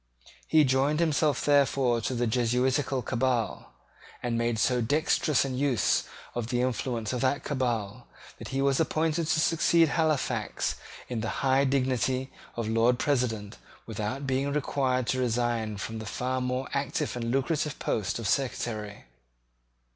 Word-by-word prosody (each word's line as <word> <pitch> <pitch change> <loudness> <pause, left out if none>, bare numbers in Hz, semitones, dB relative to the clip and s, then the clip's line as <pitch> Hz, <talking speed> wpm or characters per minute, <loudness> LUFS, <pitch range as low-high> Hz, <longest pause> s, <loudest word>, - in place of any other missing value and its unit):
He 155 -1 +5
joined 135 +3 +2
himself 155 -4 +1
therefore 135 -4 +3
to 125 - -2
the 120 0 0
Jesuitical 125 +3 +1
cabal, 125 -3 -1 0.5
and 120 -1 -1
made 115 0 0
so 125 +2 +2
dexterous 150 +2 +2
an 130 -2 -3
use 135 -8 +2 0.3
of 120 -2 -3
the 125 0 0
influence 120 -2 -2
of 125 - -2
that 135 +2 +1
cabal 120 -4 -2 0.3
that - - -7
he 135 0 -1
was 140 -1 +2
appointed 160 0 0
to 155 - +2
succeed 165 0 +3
Halifax 155 -2 0 0.3
in 120 -3 -3
the 110 - -2 0.2
high 135 +1 +4
dignity 130 -1 0 0.2
of 115 -2 -3
Lord 115 +2 +3
President 120 -7 -1 0.3
without 110 +5 -4
being 135 +1 0
required 130 -3 0
to 130 - 0
resign 120 -3 0
the 110 +2 -5
far 130 +4 -2
more 125 +1 -2
active 140 -2 -1
and 115 -1 -3
lucrative 145 +3 0
post 105 -4 -1
of 115 -3 -3
Secretary. 110 -6 -2
130 Hz, 145 wpm, -28 LUFS, 115-140 Hz, 0.5 s, He